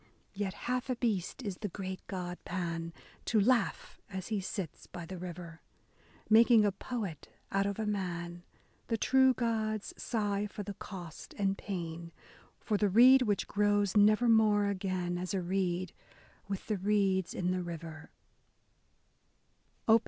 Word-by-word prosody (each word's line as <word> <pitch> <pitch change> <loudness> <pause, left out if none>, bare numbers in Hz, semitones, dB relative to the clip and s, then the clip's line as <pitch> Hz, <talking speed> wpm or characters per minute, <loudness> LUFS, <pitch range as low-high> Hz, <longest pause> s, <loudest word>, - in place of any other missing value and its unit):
Yet 195 -1 -3
half 250 +1 -1
a 255 - +1
beast 225 -1 -1
is 200 -5 -4
the 210 - -3
great 190 -1 -5
god 180 -2 -4
Pan, 170 -2 -3 0.3
To 220 - +3
laugh 230 0 +1
as 190 -1 -5
he 210 -3 0
sits 190 -3 -5
by 175 -1 -8
the 185 +1 -7
river, 170 -2 -8 0.7
Making 225 0 +6
a 205 - +3
poet 195 - -5 0.2
out 195 0 +2
of 200 - -3
a 220 - -2
man: 175 -4 -3 0.5
The 225 - 0
true 265 +3 +4
gods 220 -3 -1
sigh 205 -3 -1
for 205 0 -6
the 200 - -5
cost 175 -5 -9
and 195 -1 +1
pain, 170 -4 -5 0.2
— - - -27
For 210 - +1
the 205 0 +2
reed 255 +6 +8
which 210 -5 +1
grows 205 -1 +2
nevermore 215 0 +5
again 185 -3 -1
As 185 +2 -3
a 190 - 0
reed 185 -1 -1 0.5
with 195 -1 -4
the 215 - -1
reeds 195 -2 +1
in 180 0 0
the 185 0 0
river. 165 -2 -7
195 Hz, 150 wpm, -32 LUFS, 180-215 Hz, 0.7 s, reed